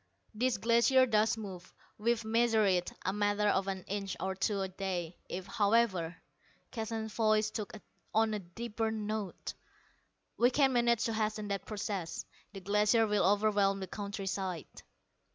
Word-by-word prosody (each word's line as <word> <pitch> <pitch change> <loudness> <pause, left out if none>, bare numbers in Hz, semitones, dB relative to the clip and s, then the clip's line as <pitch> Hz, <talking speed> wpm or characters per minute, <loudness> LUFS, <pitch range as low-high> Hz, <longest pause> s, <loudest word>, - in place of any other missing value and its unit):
"This 240 +1 +1
glacier 235 +4 +4
does 220 -1 +2
move. 190 -4 -8 0.3
We've 230 +1 +1
measured 225 -1 +3
it 180 -1 +1
a 190 - +1
matter 205 0 +2
of 195 -1 +1
an 190 -1 -3
inch 195 -1 -4
or 190 0 -1
two 200 +1 0
a 190 - -1
day. 185 -3 -4
If, 180 +1 -4
however," 200 -6 +1 0.5
Keston's 220 -1 -4
voice 215 -1 +2
took 215 -2 -4 0.4
on 220 0 +2
a 210 - -1
deeper 220 +5 -3
note 215 -2 -4 0.8
"we 245 - +5
can 270 0 +3
manage 235 -2 +3
to 230 - 0
hasten 215 -1 -1
that 200 -1 -2
process, 200 -5 -4 0.3
the 195 -1 -9
Glacier 210 +4 +3
will 210 -1 +2
overwhelm 200 0 +3
the 190 - -3
countryside." 195 -3 -4
210 Hz, 150 wpm, -32 LUFS, 195-225 Hz, 0.8 s, we